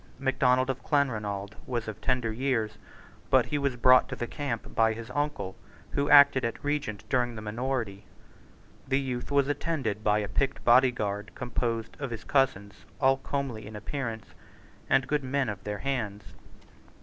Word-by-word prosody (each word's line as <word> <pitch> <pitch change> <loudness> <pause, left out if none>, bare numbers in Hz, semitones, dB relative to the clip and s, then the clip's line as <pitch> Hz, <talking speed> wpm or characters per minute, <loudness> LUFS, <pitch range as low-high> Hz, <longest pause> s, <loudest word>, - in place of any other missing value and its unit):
Macdonald 130 -1 +2
of 130 -1 -7
Clanronald 105 -9 0
was 120 -3 -2
of 110 - -6
tender 125 -3 0
years: 120 -3 -1 0.5
but - - +5
he 145 - -1
was 140 -3 0
brought 130 +1 +5
to - - -4
the 120 - -3
camp 120 -2 -4
by 110 0 +3
his 115 +2 -8
uncle, 140 -9 -2 0.4
who 140 0 0
acted 140 -2 +7
at 115 -1 -3
Regent 145 -8 -2
during 120 -2 +1
the 110 - -6
minority. 110 -2 -3 0.8
The 135 0 +2
youth 125 -3 -4
was 140 -1 +3
attended 145 -8 -2
by 105 -1 +3
a 105 -1 -1
picked 135 +6 -1
body 130 +2 +7
guard 105 -3 -4
composed 115 -2 -2
of 140 -2 -3
his 115 -1 -6
own - - -20
cousins, 100 -8 0
all 135 -1 +4
comely 135 -6 -4
in 110 - -9
appearance, 115 0 -4 0.6
and 130 -1 +3
good 150 -1 0
men 135 -1 0
of 100 -2 -6
their 105 0 -3
hands. 110 -5 -3
125 Hz, 170 wpm, -28 LUFS, 110-135 Hz, 0.8 s, acted